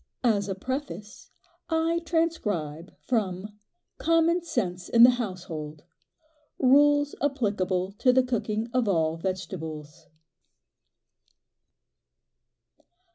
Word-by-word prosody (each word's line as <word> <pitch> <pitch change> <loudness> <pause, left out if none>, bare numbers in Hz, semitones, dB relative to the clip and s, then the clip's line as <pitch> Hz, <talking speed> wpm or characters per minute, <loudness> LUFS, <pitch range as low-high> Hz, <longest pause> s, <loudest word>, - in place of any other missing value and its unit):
As 205 -4 +2
a 195 - -2
preface 215 - -6 0.4
I 325 +1 +1
transcribe 205 - -2
from 210 -3 -2 0.4
"Common 330 +1 +3
Sense 190 - -3
in 235 0 +6
the 250 - +9
Household" 175 -10 -5 0.7
"RULES 290 +2 +4
APPLICABLE 200 -9 0
TO 250 - +5
THE 260 +1 +4
COOKING 230 -3 -2
OF 250 -3 +1
ALL 165 -4 +1
VEGETABLES." 160 -5 -6
210 Hz, 85 wpm, -27 LUFS, 180-270 Hz, 0.7 s, the